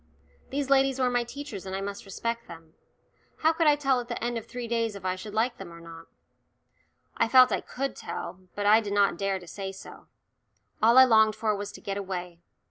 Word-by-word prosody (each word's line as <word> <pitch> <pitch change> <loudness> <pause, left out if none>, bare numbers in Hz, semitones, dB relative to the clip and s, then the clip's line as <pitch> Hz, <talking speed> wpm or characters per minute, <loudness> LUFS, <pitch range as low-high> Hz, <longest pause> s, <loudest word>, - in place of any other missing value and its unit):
These 275 0 -2
ladies 270 -1 +4
were 250 -1 +2
my 245 0 +1
teachers 240 -5 -8
and 190 - -4
I 195 - -3
must 200 +1 -6
respect 230 +4 -4
them. 165 -1 -12 0.7
How 320 +1 +5
could 325 -1 +1
I 295 - +6
tell 275 -3 +1
at 240 - -6
the 240 -1 -5
end 240 0 -1
of 230 -1 -5
three 245 0 -6
days 230 -2 -1
if 195 -2 -9
I 185 0 0
should 205 +3 -9
like 240 +3 +1
them 190 -3 -8
or 170 - -11
not? 165 0 -12 1.1
I - - +3
felt 255 +2 +7
I - - 0
could 275 +1 -4
tell, 185 - -6 0.2
but 205 - -3
I 215 +2 +6
did 205 -2 -4
not 200 -1 +3
dare 195 +1 -1
to 180 - -12
say 195 +2 -6
so. 195 - -12 0.7
All 230 +3 +5
I 260 - +11
longed 220 -3 +5
for 215 -1 0
was 205 0 -5
to - - -11
get 200 0 -4
away. 180 -3 -5
220 Hz, 225 wpm, -27 LUFS, 195-245 Hz, 1.1 s, I